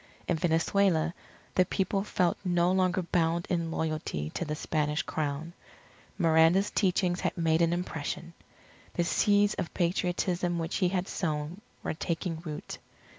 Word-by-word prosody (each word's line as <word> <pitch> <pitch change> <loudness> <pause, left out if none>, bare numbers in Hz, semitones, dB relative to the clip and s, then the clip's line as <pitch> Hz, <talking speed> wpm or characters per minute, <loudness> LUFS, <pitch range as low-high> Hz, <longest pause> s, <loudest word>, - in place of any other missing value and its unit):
In 175 - +2
Venezuela 165 +1 +2 0.4
the 185 - +5
people 195 +1 0
felt 180 -4 +1
no 175 -1 +2
longer 185 0 +2
bound 170 0 +1
in 170 -2 0
loyalty 155 - -2
to - - -3
the 150 -2 -3
Spanish 150 -1 -1
Crown. 155 +2 -3 0.6
Miranda's 165 +3 +4
teachings 180 -2 +1
had - - -1
made 165 -1 +2
an 165 0 +3
impression. 170 -1 -3 0.6
The 175 - +2
seeds 205 +3 +3
of 165 - -4
Patriotism 175 0 0
which 165 +1 -2
he 185 -3 +2
had 185 0 -1
sown 155 +2 -3 0.2
were - - -1
taking 165 0 -3
root. 155 -3 -6
170 Hz, 140 wpm, -29 LUFS, 160-180 Hz, 0.6 s, the